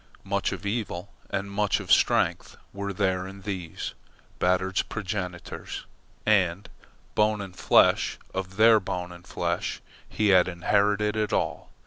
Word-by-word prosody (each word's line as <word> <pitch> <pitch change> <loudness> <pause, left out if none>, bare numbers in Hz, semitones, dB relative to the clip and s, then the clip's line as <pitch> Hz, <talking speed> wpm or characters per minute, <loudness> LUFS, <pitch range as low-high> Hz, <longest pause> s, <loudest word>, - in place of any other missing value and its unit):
Much 100 0 0
of - - -6
evil 100 -3 -3 0.2
and 100 +1 -3
much 100 0 +1
of - - -5
strength - - +3 0.2
were 100 0 -3
there 95 -1 0
in 95 +1 -10
these, 95 -5 -5 0.5
Batard's 95 +1 +2
progenitors, 95 -4 -5 0.4
and, 100 -3 +2 0.5
bone 105 0 +2
and 95 -3 -7
flesh - - +4 0.2
of 95 0 -4
their 110 0 +7
bone 90 -2 -4
and 85 0 -13
flesh, - - -2 0.3
he 105 -1 +1
had 95 -2 +6
inherited 100 +4 +1
it 110 -1 0
all. - - -1
100 Hz, 135 wpm, -27 LUFS, 90-105 Hz, 0.5 s, their